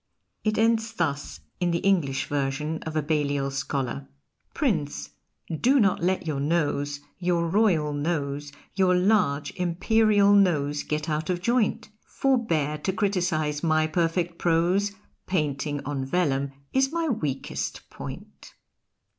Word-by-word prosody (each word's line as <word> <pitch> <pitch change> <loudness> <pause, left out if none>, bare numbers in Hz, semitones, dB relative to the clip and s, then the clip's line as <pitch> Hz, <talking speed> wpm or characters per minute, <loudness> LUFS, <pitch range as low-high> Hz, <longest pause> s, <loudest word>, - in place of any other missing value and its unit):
It 215 0 0
ends 225 0 +2
thus 140 - -2 0.2
in 175 - +1
the 170 - +1
English 165 -9 +2
version 145 +3 -2
of 160 - -5
a 155 - +1
Balliol 145 -2 0
scholar: 135 0 -3 0.5
Prince, 165 - -1 0.4
do 260 - +3
not 195 -6 +3
let 185 +1 0
your 150 -4 -2
nose, 145 -2 0 0.2
your 175 -2 +1
Royal 165 -6 +2
nose, 145 -1 -2 0.2
Your 185 -1 +3
large 180 -7 +2
Imperial 205 +3 +3
nose 150 -8 +3
get 150 +1 -3
out 155 +1 -2
of 180 -1 0
joint; 235 +2 0
Forbear 165 - 0
to 190 - -1
criticise 180 -7 0
my 155 -2 +2
perfect 170 +1 0
prose 180 +5 +2 0.3
Painting 145 -4 -1
on 140 -2 -2
vellum 140 -3 0 0.2
is 270 +1 +2
my 335 0 -1
weakest 150 - -3
point. - - -10
165 Hz, 130 wpm, -26 LUFS, 145-195 Hz, 0.5 s, do